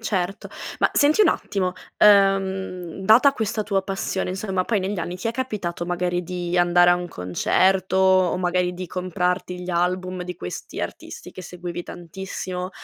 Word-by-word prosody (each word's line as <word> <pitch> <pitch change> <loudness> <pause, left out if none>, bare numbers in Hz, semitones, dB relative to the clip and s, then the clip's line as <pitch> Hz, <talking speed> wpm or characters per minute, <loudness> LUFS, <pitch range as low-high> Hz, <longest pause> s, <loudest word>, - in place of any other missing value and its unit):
Certo. 195 -3 -2 0.3
Ma - - +4
senti 305 +8 +4
un - - +5
attimo, 185 - -1 0.3
uhm, 195 -3 +3
data 240 +7 +6
questa 220 -4 -2
tua 195 -2 0
passione, 190 -1 -2
insomma, 190 0 -1
poi 220 +1 +1
negli 190 0 -2
anni 175 +2 -4
ti 185 - -5
è 225 - 0
capitato 210 -9 -3
magari 175 0 -1
di 180 0 -3
andare 175 0 +5
a - - +6
un 175 0 -4
concerto, 185 - +1
o 185 -1 +4
magari 180 0 0
di 185 +1 -6
comprarti 180 0 -2
gli 180 0 -5
album 180 +1 -1
di 180 -1 -6
questi 90 - -6
artisti - - -7
che 185 - -9
seguivi 175 0 -6
tantissimo? 180 +1 -6
185 Hz, 165 wpm, -23 LUFS, 175-195 Hz, 0.3 s, data